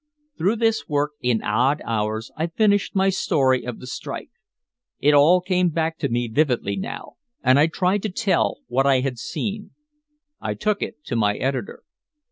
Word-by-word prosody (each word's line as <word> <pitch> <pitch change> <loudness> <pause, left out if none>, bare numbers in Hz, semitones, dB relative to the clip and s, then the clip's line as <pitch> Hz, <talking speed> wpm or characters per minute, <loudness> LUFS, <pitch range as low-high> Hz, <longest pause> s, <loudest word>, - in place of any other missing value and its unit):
Through 195 +7 +1
this 225 -1 0
work, 145 0 0
in 120 -3 +1
odd 125 +7 +2
hours, 110 0 -2
I 160 +2 -1
finished 205 +4 +1
my 190 0 +3
story 135 -8 +1
of 125 -2 -6
the - - -10
strike. 135 +2 -6 0.7
It 150 +1 +4
all 155 +6 +6
came 180 -1 +1
back 160 0 -2
to - - -1
me 120 +1 0
vividly 120 -5 0
now 95 - -6 0.3
and 130 +1 +5
I 150 - +5
tried 185 +4 0
to 215 - -2
tell 200 +1 0
what 135 +3 +1
I 135 -2 +4
had 130 -2 -3
seen. 210 - -5 0.6
I - - -3
took 210 -1 -1
it 150 - -6
to - - -3
my 105 -2 +2
editor. 135 - -3
145 Hz, 175 wpm, -23 LUFS, 125-185 Hz, 0.7 s, all